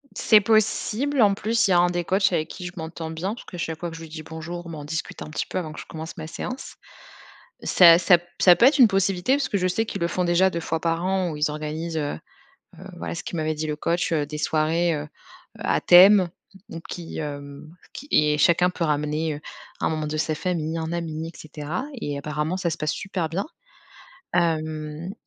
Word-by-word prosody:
C'est 215 -2 +5
possible, 220 +5 +1
en 205 -2 +5
plus 220 +3 +1
il - - +1
y - - +5
a 175 - +5
un 175 0 +4
des 175 0 -1
coachs 190 +2 +2
avec 155 -2 0
qui 180 - -8
je 175 - -6
m'entends 160 -1 -6
bien 175 +6 -3
parce 235 - -11
que 180 - -9
chaque 160 -2 -4
fois 175 - -4
que 165 - -9
je 165 - -9
lui 165 - -9
dis 155 0 -8
bonjour, 170 +2 -7
bah, 160 - -7
on 145 - -7
discute 155 +1 -5
un - - -6
petit 155 - -3
peu - - -5
avant 165 -4 -3
que 155 - -9
je - - -8
commence 160 0 -8
ma 155 -1 -6
séance. 255 +10 -6 0.9
Ça 170 -2 +7
ça 180 0 +6
p 175 - -22
ça 180 -2 +7
peut 235 - +5
être 280 +2 +5
une 245 - +9
possibilité, 195 +3 +1
parce 275 -2 0
que 205 - 0
je 185 -1 +1
sais 225 +5 0
qu'ils 200 - -5
le 170 - +1
font 180 +1 -1
déjà 175 +2 +3
2 170 -2 -4
fois 160 0 -2
par 165 +1 -1
an 185 -2 0
où - - -5
ils 150 0 +1
organisent, 155 +2 -4
heu 145 - -2 0.6
heu, - - -10
voilà 85 -1 -5
ce - - -6
qu'il 170 - -5
m'avait 155 0 -1
dit 155 +1 -3
le 150 -1 -2
coach, 170 +3 -1
heu, 150 -2 0
des 150 +1 -6
soirées, 160 +3 +1
heu, 150 0 -5 0.5
à - - 0
thème, 185 0 +7 0.4
donc 165 -3 -7
qui, 170 -2 -7
hem, 145 -1 -7 0.2
qui 285 - -10
et 150 0 +3
chacun 175 +3 +4
peut 180 -1 -3
ramener, 150 +1 -1
heu, - - -10 0.4
un - - +1
membre 155 -1 -2
de 155 - -3
sa 155 0 0
famille, 165 -1 -2
un 160 0 -3
ami 165 -2 -4
et 165 - -12
cetera 155 - -5 0.2
et 145 -6 -3
apparemment 150 +4 -2
ça 180 -2 -1
se 165 - -4
passe 155 0 -1
super 185 -5 -3
bien. 180 +5 -2 0.9
Hem. 155 0 -1
165 Hz, 235 wpm, -24 LUFS, 155-185 Hz, 0.9 s, une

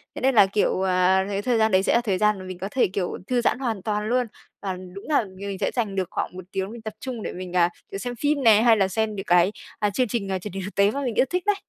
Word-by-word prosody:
thế - - -6
nên 265 0 +2
là, 205 - +8
kiểu, 195 -1 0
à, 190 0 +3
cái 200 0 -1
thời 240 +2 +1
gian 220 0 +3
đấy 185 0 +4
sẽ - - +2
là 235 - +4
thời 205 -6 0
gian 210 0 +2
mà 185 - -8
mình 185 -1 -7
có 190 +2 -4
thể, 260 - +3
kiểu, 185 -1 -3
thư 250 -1 +1
giãn 240 - +1
hoàn 230 -7 -2
toàn 210 +1 -2
luôn. 250 0 +1 0.3
Và 195 -2 -2 0.2
đúng 200 - -9
là 285 -6 +3
m - - -10
mình 200 0 -5
sẽ - - 0
dành 220 -6 -1
được 190 -2 -1
khoảng - - -3
1 185 - -7
tiếng 190 +1 -3
mình 235 0 -9
tập 220 -1 -6
trung 245 -4 -5
để - - -4
mình, 180 0 -7
à, 175 -1 +4 0.2
kiểu, - - -4
xem 245 +3 -4
phim 290 -1 +1
nè, 220 -3 +6
hay 230 -1 +5
là 195 -2 +3
xem 215 +2 -1
những 195 0 -5
cái, 180 0 +4 0.3
à, 210 - +2
chương 250 +5 0
trình, 200 -3 -2
à, 190 - -1
truyền 195 +1 -8
hình 195 0 -4
thực 200 - -8
tế 200 +1 +4
mà 280 - -3
mình 245 -5 -2
yêu - - +4
thích 360 0 -1
đấy. 415 -1 +3
205 Hz, 320 wpm, -24 LUFS, 190-235 Hz, 0.3 s, là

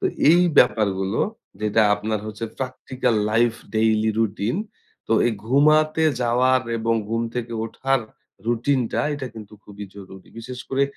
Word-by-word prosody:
তো - - -4 0.3
এই 175 +2 +6 0.2
ব্যাপারগুলো, 100 -1 +2 0.4
যেটা 110 +1 +2
আপনার 105 0 -3
হচ্ছে 110 +1 -5
practical 130 -1 -2 0.2
life, 115 +1 +2 0.2
daily 110 0 +2
routine 110 - -1 0.5
তো - - +1
এই 120 - +1
ঘুমাতে 155 +4 +3 0.2
যাওয়ার 125 +2 +3 0.2
এবং 115 +1 +1
ঘুম 115 +1 -1
থেকে 120 -1 -4
ওঠার 135 +3 -1 0.5
রুটিন 120 +4 +1
টা - - 0
এটা 140 -2 -5
কিন্তু 105 -2 -11
খুবই 105 0 -9
জরুরি। 95 -1 -12
বিশেষ 125 +2 -8
করে 135 +1 +1
115 Hz, 140 wpm, -22 LUFS, 110-130 Hz, 0.5 s, এই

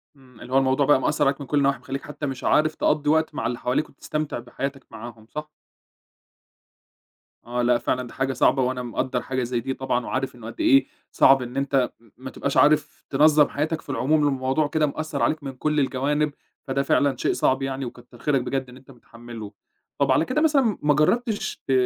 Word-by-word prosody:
إمم، 130 -4 -19
اللي 130 - -8
هو - - +5
الموضوع 135 +1 +3
بقى 145 -1 +5
مأثّر - - +1
عليك 140 +1 0
من 140 - -7
كُلّ 145 - 0
النواحي 140 -1 +2
مخليك 135 +1 -5
حتى 150 0 -6
مش 135 -3 -5
عارف 155 +1 +2
تقضّي 150 -1 +1
وقت 160 0 +2
مع - - -1
اللي 120 0 -3
حواليك، 125 +5 -1
وتستمتع 150 0 -4
بحياتك 135 +3 -6
معاهم، 115 -1 -10
صح؟ 150 0 -6 2.0
آه، 120 +1 -2
لأ، 120 0 +3
فعلًا 125 +1 -2
دي - - -13
حاجة 135 0 -1
صعبة، 130 +2 +3
وأنا 125 0 -1
مقدّر 125 +1 -2
حاجة 130 -1 -2
زي 120 0 -1
دي 130 +3 -3
طبعًا، 130 -2 -2
وعارف 130 -1 -3
إنه 115 -2 -10
قد - - -10
إيه 295 -4 +5 0.3
صعب 135 0 +5
إن 125 +1 -6
أنت 135 -2 +1
م 115 -1 -23
ما 130 +1 -8
تبقاش 140 +1 -3
عارف 150 0 +3
تنظّم 150 +1 +5
حياتك 155 +2 -2
في - - -19
العموم، 145 +3 +2
الموضوع 135 +2 0
كده 155 +1 +1
مأثّر 155 +2 -4
عليك 155 -1 0
من 135 - -4
كُلّ 150 +3 -1
الجوانب، 145 +2 0 0.3
فده 140 +1 0
فعلًا 140 0 +2
شيء - - 0
صعب 130 +1 +1
يعني، 135 0 -3
وكتّر 120 0 -11
خيرك 140 -1 +1
بجد 130 +1 -3
إن 125 - -13
أنت 135 +1 -17
متحمّلُه، 115 -3 -11 0.5
طَب 140 -1 +2
على 145 +5 +3
كده 260 - 0
مثلًا 275 -9 +3
ما 150 0 +3
جرّبتش 215 - 0
ت - - -1
135 Hz, 205 wpm, -24 LUFS, 125-150 Hz, 2.0 s, هو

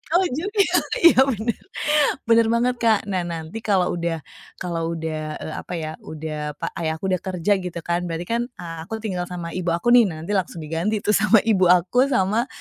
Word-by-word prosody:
Oh, 375 - +5 0.2
juga. 405 +3 +1 0.4
Iya, 340 -6 +7
benar. 230 -3 -2 0.6
Benar 230 0 +4
banget, 245 +2 +2
Kak. 225 -3 +4
Nah, 180 -2 -1
nanti 165 +5 -5
kalau 195 -5 +1
udah, 170 -2 -2 0.3
kalau 170 -2 -3
udah, 155 -1 -4
eee, 155 - -6
apa - - -8
ya 155 - -4
udah, 150 -1 -6
pa 165 +3 -4
ayah 160 -1 -1
aku 190 +4 -3
udah 185 - +1
kerja, 185 +2 -2
gitu 180 -2 -5
kan, 175 +1 -1
berarti 165 0 -3
kan, 230 +5 -1
eee, 175 -9 -9
aku 220 0 -5
tinggal 180 -4 -3
sama 175 -2 -6
ibu 180 -1 -4
aku 175 +8 +1
nih, 240 -3 +7
nanti 165 +2 -6
langsung 180 -4 -1
diganti 170 +7 -2
tuh - - +2
sama 210 0 +4
ibu 195 -5 +3
aku, 180 +9 +4
sama 225 -1 +1
180 Hz, 195 wpm, -22 LUFS, 165-220 Hz, 0.6 s, Iya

